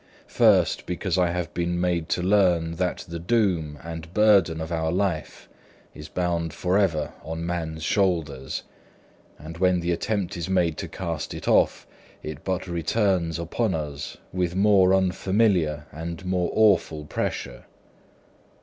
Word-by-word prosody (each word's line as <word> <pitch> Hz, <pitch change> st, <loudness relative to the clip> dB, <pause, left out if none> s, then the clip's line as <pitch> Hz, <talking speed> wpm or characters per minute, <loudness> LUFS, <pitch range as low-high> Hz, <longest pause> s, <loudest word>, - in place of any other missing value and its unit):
First, -, -, +3 dB
because 90 Hz, +1 st, -1 dB
I 90 Hz, -1 st, +3 dB
have 85 Hz, -2 st, -3 dB
been 85 Hz, 0 st, -1 dB
made 85 Hz, -2 st, 0 dB
to 90 Hz, -, 0 dB
learn 90 Hz, -4 st, +2 dB
that 90 Hz, -1 st, -2 dB
the 85 Hz, 0 st, -6 dB
doom 90 Hz, -6 st, 0 dB
and 80 Hz, 0 st, -7 dB
burthen 100 Hz, -6 st, +4 dB
of 80 Hz, +1 st, -5 dB
our 80 Hz, -1 st, 0 dB
life 90 Hz, -3 st, -2 dB, 0.5 s
is 75 Hz, +1 st, -10 dB
bound 85 Hz, -2 st, -1 dB
for 90 Hz, +2 st, +1 dB
ever 85 Hz, -7 st, 0 dB
on 80 Hz, +1 st, -5 dB
man's 80 Hz, -2 st, -3 dB
shoulders, 80 Hz, -9 st, 0 dB, 0.7 s
and 80 Hz, +3 st, -9 dB
when 90 Hz, -1 st, +3 dB
the 85 Hz, 0 st, -1 dB
attempt 100 Hz, +2 st, -1 dB
is 85 Hz, 0 st, -4 dB
made 90 Hz, -4 st, +2 dB
to -, -, -4 dB
cast 85 Hz, -5 st, -4 dB
it -, -, -8 dB
off, -, -, +3 dB, 0.4 s
it 75 Hz, -2 st, -7 dB
but 95 Hz, 0 st, -2 dB
returns 85 Hz, 0 st, 0 dB
upon 90 Hz, +4 st, -1 dB
us 75 Hz, -2 st, -5 dB, 0.2 s
with 90 Hz, -1 st, -1 dB
more 95 Hz, -1 st, +5 dB
unfamiliar 95 Hz, -4 st, +1 dB
and 85 Hz, +3 st, -6 dB
more 90 Hz, -1 st, 0 dB
awful 90 Hz, -8 st, +3 dB
pressure. -, -, -4 dB
85 Hz, 145 wpm, -25 LUFS, 80-95 Hz, 0.7 s, more